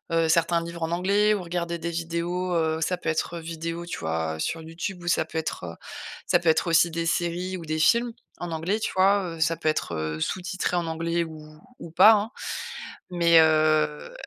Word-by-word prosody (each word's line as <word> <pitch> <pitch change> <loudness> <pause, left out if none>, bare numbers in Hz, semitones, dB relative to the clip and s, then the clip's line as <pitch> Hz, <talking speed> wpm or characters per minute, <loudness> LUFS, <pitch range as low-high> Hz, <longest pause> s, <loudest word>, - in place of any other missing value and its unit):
heu, 165 -1 +2
certains 170 +1 +2
livres 170 0 -6
en 165 - -2
anglais 200 +4 +3
ou 195 - -3
regarder 170 0 -3
des 170 +1 -3
vidéos. 170 +2 -2
Heu, 160 -1 0
ça 180 +2 0
peut 165 - -3
être 165 +2 -2
vidéo, 165 +1 -5
tu 175 - -5
vois, 80 0 -2
sur 165 - -2
YouTube 175 +3 -6
ou - - -8
ça 165 - +2
peut 160 - -7
être 90 - -5 0.5
ça 175 - +4
peut 170 -2 +1
être 160 - +2
aussi 170 0 +4
des 165 0 -2
séries 175 +2 -1
ou 165 - -9
des 155 0 -2
films 235 +9 +3 0.3
en 175 -1 -5
anglais, 170 +7 -1
tu - - -1
vois? 195 +1 +4
Heu, - - -12
ça 165 +1 +2
peut 155 - 0
être, 85 - -2
heu, 80 0 -3
sous-titré 185 - -2
en 170 -1 -1
anglais 165 +1 -1
ou 155 -1 -11 0.2
ou 165 - -9
pas, 210 +6 +8
hein, 215 +3 0 0.8
mais, 170 -1 +5
heu, 155 - +2
170 Hz, 205 wpm, -25 LUFS, 160-175 Hz, 0.8 s, pas